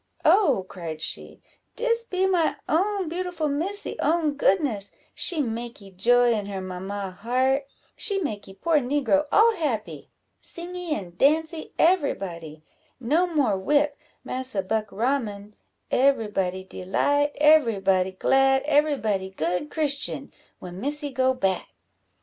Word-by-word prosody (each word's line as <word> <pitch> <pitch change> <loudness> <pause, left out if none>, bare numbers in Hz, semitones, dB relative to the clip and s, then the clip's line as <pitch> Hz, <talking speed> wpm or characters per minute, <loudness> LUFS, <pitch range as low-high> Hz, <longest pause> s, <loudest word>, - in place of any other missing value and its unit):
"Oh," 290 - +4
cried 165 -5 -7
she, 155 - -5 0.3
"dis 465 -1 0
be 375 -4 0
my 360 -4 +2
own 385 +3 +1
beautiful 345 -1 -2
Missy 345 +9 -2
own 310 0 +1
goodness; 270 - +1 0.2
she 325 -5 +1
makee 230 -4 -6
joy 240 +5 +4
in 205 -3 -2
her 195 -1 -4
mamma 190 +1 -5
heart; 260 +7 0 0.3
she 400 -3 0
makee 205 - -5
poor 325 +6 +2
negro 285 +2 +1
all 455 +2 +5
happy 270 - -3 0.3
singee 350 -2 -5
and 175 -3 -8
dancee 315 +3 +1
every 340 -4 +3
body; 165 -5 -8 0.4
no 310 +9 +2
more 275 - +1
whip, 290 +8 +2 0.3
massa 255 -6 -3
Buckraman 215 0 -2 0.4
every 260 -5 +3
body 190 -2 -2
delight 285 +11 0
every 295 -8 +5
body 190 -1 +2
glad 270 +6 +3
every 295 0 +2
body 195 -5 -1
good 180 - -2
Christian, 290 -3 -2 0.3
when 180 +1 -9
Missy 290 +2 -3
go 260 0 +1
back!" 195 -6 -1
265 Hz, 130 wpm, -25 LUFS, 200-310 Hz, 0.4 s, all